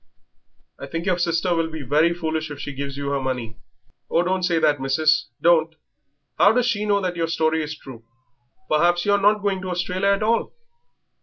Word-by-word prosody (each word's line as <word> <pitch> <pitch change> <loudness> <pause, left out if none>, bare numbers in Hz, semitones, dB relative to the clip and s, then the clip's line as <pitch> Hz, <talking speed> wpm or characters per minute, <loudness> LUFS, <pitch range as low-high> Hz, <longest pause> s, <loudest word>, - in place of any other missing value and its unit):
"I - - -7
think 165 +1 -5
your 180 -2 +1
sister 170 +1 +1
will 165 -1 0
be 160 -2 -7
very 150 +6 +2
foolish 160 -2 -3
if 145 - -7
she 145 - -6
gives 140 0 -6
you 140 0 -3
her 140 -1 -1
money." 125 -4 -4 0.5
"Oh, 170 - +2
don't 185 +1 -1
say 175 -2 +1
that, 145 -3 +2
missis, 155 +3 +2
don't." 165 -1 +3 0.6
"How 205 - +6
does 250 0 +2
she 210 -4 0
know 200 -1 +2
that 180 -2 -2
your 165 -1 -1
story 160 -1 0
is 155 0 -5
true? 120 -6 -12 0.6
Perhaps 175 +3 +2
you 205 - +2
are 200 0 +2
not 205 +1 +3
going 195 -2 -1
to 185 - -5
Australia 180 +2 -1
at 200 +1 +2
all." 230 +2 0
165 Hz, 205 wpm, -22 LUFS, 150-185 Hz, 0.6 s, How